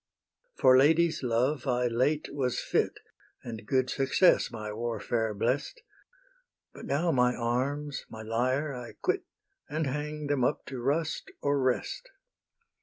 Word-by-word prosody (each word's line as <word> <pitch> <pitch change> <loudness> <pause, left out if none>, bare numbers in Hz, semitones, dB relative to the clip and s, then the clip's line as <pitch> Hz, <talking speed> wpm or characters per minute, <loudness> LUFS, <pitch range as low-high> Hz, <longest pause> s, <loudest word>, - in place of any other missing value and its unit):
For 130 - +6
ladies's 160 +3 +4
love 125 +3 0
I 125 -1 +1
late 130 +6 +1
was 130 -4 -1
fit, - - 0 0.4
And 110 -3 -7
good 130 -1 +2
success 135 +8 +3
my 105 -2 -6
warfare 115 0 -1
blest, 130 - -1 0.9
But - - -10
now 165 +5 +1
my 125 -2 +3
arms, 135 +5 -2
my 110 0 -8
lyre 130 +6 0
I 125 -2 -7
quit, 380 0 -1 0.4
And 155 +1 -1
hang 150 +2 -3
them 145 -3 +1
up - - 0
to 130 -2 -6
rust 150 +5 -1
or 140 -1 +2
rest. 130 - -1
130 Hz, 135 wpm, -29 LUFS, 120-150 Hz, 0.9 s, For